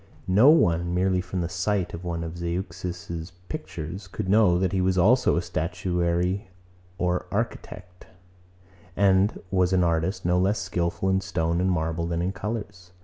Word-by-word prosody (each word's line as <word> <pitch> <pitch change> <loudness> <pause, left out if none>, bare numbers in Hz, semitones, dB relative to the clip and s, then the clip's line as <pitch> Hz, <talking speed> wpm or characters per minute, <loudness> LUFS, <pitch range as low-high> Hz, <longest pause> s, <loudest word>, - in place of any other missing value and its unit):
No 105 +9 +6
one, 85 - +3
merely 90 0 +2
from 90 0 -4
the 85 - -1
sight 90 +2 -1
of 85 - -7
one 85 -1 -3
of 80 +1 -6
Zeuxis's 85 0 -5 0.2
pictures, 85 +5 -6
could 95 +2 -5
know, 100 -4 +5
that 95 0 0
he 95 -1 0
was 95 0 +1
also 120 +8 +4
a 85 - 0
statuary 90 +3 -1 0.5
or 90 -1 -1
architect, 95 -4 -5 0.9
and 100 +1 +3
was 95 -1 +2
an 90 -1 +3
artist 85 +3 0
no 90 +1 +3
less 100 +3 +2
skilful 90 -1 -2
in 95 0 +2
stone 85 -2 -1
and 95 - +2
marble 80 -1 -1
than 85 0 -1
in 90 - 0
colours. 100 -2 -6
90 Hz, 160 wpm, -25 LUFS, 85-95 Hz, 0.9 s, No